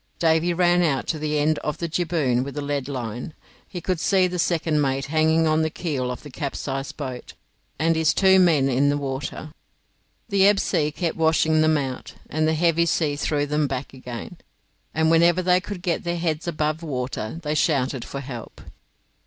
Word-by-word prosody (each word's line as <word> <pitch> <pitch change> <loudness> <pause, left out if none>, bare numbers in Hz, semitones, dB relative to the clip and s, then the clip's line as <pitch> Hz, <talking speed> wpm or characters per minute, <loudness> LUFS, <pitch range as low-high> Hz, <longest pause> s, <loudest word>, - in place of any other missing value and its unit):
Davy 165 +1 +2
ran 175 0 +3
out 150 -6 +1
to 160 - -1
the 150 0 -1
end 150 +1 +1
of 150 - -3
the 170 - -3
jibboom 155 -7 0
with 140 +2 -7
a - - -1
lead 140 -2 -2
line. 125 +1 -5 0.3
He 180 - -7
could 180 0 -1
see 190 +2 +3
the 180 0 -2
second 160 -3 +1
mate 135 -1 0
hanging 160 +1 +3
on 155 0 +2
to 160 - +2
the - - 0
keel 145 -7 -3
of 125 - -6
the 145 - -10
capsized 135 0 -4
boat, 130 -4 -6 0.4
and 165 +2 +2
his 160 -1 +3
two 190 +1 +5
men 160 -7 +4
in 135 +2 +2
the 145 - +1
water. 140 +2 -5 0.8
The 200 -2 +4
ebb 205 -1 +4
sea 150 -1 +1
kept 165 +2 -3
washing 160 -1 +3
them 155 0 +3
out, 135 -3 -5 0.2
and 155 +1 +1
the 160 - +2
heavy 170 +1 +2
sea 155 -3 +1
threw 145 0 0
them 150 0 0
back 135 0 -5
again, 130 +5 -8 0.5
and 160 +1 +2
whenever 170 +2 +4
they 180 0 +3
could 200 -2 -7
get 175 -3 -1
their 175 0 -2
heads 165 -1 -2
above 155 -1 -1
water 130 -3 -4
they 150 0 -1
shouted 135 -5 +1
for 140 - -6
help. 125 -4 -8
155 Hz, 195 wpm, -23 LUFS, 140-170 Hz, 0.8 s, two